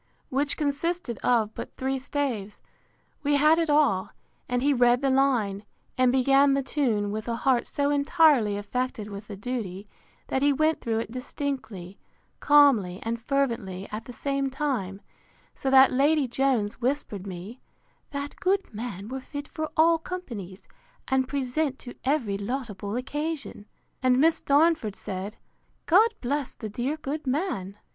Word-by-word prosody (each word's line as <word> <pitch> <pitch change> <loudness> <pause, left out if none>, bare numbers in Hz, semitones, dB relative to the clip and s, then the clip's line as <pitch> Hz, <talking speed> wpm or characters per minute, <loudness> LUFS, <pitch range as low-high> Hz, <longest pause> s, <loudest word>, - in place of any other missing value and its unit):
] - - -41
which 280 +2 0
consisted 295 - -2
of 225 -3 +2
but - - -8
three 265 0 -1
staves, 255 -7 -3 0.6
we 290 0 +2
had 305 +3 +5
it 330 -2 0
all; 285 -11 +3 0.4
and 245 0 0
he 285 +1 +4
read 245 -1 +4
the 270 - +3
line, 240 -7 +2 0.3
and 255 -1 +4
began 275 +2 +4
the 275 - 0
tune 230 -8 0
with 215 +2 -4
a 235 - -1
heart 245 0 +1
so 285 0 0
entirely 285 -7 +4
affected 215 +1 -3
with 200 +1 -8
the 205 - -7
duty, 205 -3 -5 0.4
that 265 - -1
he 285 +1 +4
went 310 +3 +1
through 225 -1 -1
it 225 0 -3
distinctly, 240 - -5 0.4
calmly, 260 -12 +5
and 230 +1 -3
fervently 230 -9 -1
at 215 +1 -5
the 250 - -8
same 275 +2 -1
time; 255 -9 -2 0.5
so 270 - -3
that 265 0 +7
Lady 285 +2 +3
Jones 245 -4 0
whispered 235 -7 -2
me, 190 +7 -8 0.5
That 285 0 -5
good 390 - 0
man 205 -3 -6
were 265 +3 -5
fit 285 +2 -7
for 310 0 -4
all 330 +1 +5
companies, 230 - -7 0.4
and 265 -1 +2
present 275 +1 -1
to 245 - -10
every 255 -8 0
laudable 205 -3 -4
occasion: 285 -3 -4 0.3
And 255 -1 +3
Miss 320 +3 +3
Darnford 290 - +3
said, 195 +3 -6 0.5
God 415 +7 +6
bless 280 +2 -2
the 215 - -6
dear 250 +8 -2
good 300 0 -5
man! 255 - -2
260 Hz, 155 wpm, -26 LUFS, 215-285 Hz, 0.6 s, that